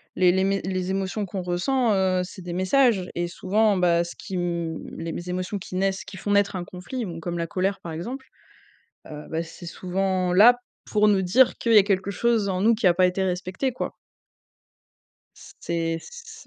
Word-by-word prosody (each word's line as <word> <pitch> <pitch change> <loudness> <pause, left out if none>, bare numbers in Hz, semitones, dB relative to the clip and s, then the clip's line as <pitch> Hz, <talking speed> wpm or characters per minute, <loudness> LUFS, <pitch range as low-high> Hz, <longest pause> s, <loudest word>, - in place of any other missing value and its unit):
Les 180 -1 +5
les 190 +1 +1
mé 195 0 +1
les 185 0 -2
émotions 195 +2 -2
qu'on 190 0 -5
ressent, 215 +7 +1
heu, 185 -1 +2
c'est 185 +1 -10
des 175 -1 -5
messages. 190 +1 +2
Et 175 0 -1
souvent, 205 +3 +1
bah, 170 -1 +3
ce 170 - -8
qui 190 - -7
m 170 -2 -2 0.2
les 165 0 -4
mé - - -5
les 180 - -9
émotions 185 +3 -3
qui 185 -1 -8
naissent 195 0 0
qui 190 - -10
font 205 +3 -3
naître 200 -1 +3
un 180 - -3
conflit, 200 +8 -6
bon, 165 -2 -6
comme 175 +1 -4
la 170 0 -2
colère, 195 0 -1
par 165 - -7
exemple. 245 +12 -6 0.8
Heu, 150 0 -8
bah, 160 +1 -1
c'est 170 +1 -11
souvent 185 +1 -1
là 220 +7 +8 0.4
pour 210 0 +4
nous 195 -2 +3
dire 235 +8 +4
qu'il 230 - +1
y - - +10
a - - +7
quelque 195 0 0
chose 225 0 +1
en 185 -1 -1
nous 230 +1 +5
qui 215 -3 -1
a 175 - +6
pas 185 0 +4
été 180 +1 -1
respecté, 185 +8 -2
quoi. - - -4 1.7
C'est 165 -1 -1
c' - - -13
c' 480 -1 -11
185 Hz, 210 wpm, -24 LUFS, 175-205 Hz, 1.7 s, y